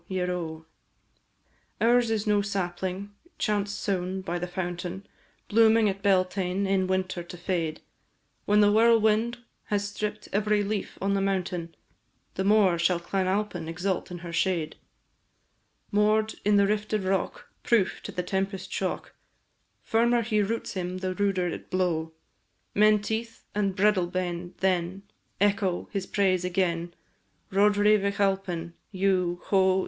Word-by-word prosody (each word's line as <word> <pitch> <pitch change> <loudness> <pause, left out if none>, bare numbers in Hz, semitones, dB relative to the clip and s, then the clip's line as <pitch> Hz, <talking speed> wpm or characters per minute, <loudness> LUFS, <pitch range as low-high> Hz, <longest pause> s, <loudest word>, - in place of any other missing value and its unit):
ieroe! 180 -4 -3 1.1
Ours 240 0 +4
is 220 -1 0
no 210 -1 +3
sapling, 190 0 -3 0.3
chance 205 -2 0
sown 190 -2 -2
by 175 -1 -3
the 180 - -3
fountain, 180 +1 -4 0.4
Blooming 225 0 +5
at 195 0 -2
Beltane, 190 -1 +1
in 190 -1 +1
winter 185 -1 -1
to 175 +1 -10
fade; 170 -3 -2 0.6
When 210 +1 +4
the 205 0 +5
whirlwind 225 +1 +4 0.3
has 205 -1 -1
stripp'd 210 +1 -4
every 210 0 +2
leaf 205 0 -3
on 195 +1 0
the 195 - +1
mountain, 180 -3 -2 0.6
The 190 - -2
more 195 -4 +4
shall 170 +1 +2
Clan 185 +2 -1
Alpine 190 -4 -1
exult 180 +3 -2
in 180 - -6
her 170 - -6
shade; 170 -3 0 1.2
Moor'd 215 +1 +2
in 210 0 +3
the 200 0 +5
rifted 210 0 -1
rock 190 0 -2
Proof 225 -6 +1
to - - -7
the 180 - -3
tempest 190 +1 -3
shock, 190 - -3 0.7
Firmer 235 +1 +2
he 215 -1 +1
roots 225 +3 -2
him 185 -1 -3
the 185 0 -2
ruder 195 -2 0
it 175 - -6
blow; 170 -3 0 0.6
Menteith 215 +2 +1
and 200 -2 0
Breadalbane, 180 -3 0
then, 185 0 0 0.4
Echo 200 -3 +1
his 195 -2 -3
praise 185 -3 +1
agen, 175 -2 -1 0.6
Roderigh 205 +2 +4
Vich 200 +1 -2
Alpine 190 -4 0 0.2
dhu, 185 -3 +1
ho! 190 -1 +3
195 Hz, 135 wpm, -27 LUFS, 180-210 Hz, 1.2 s, Blooming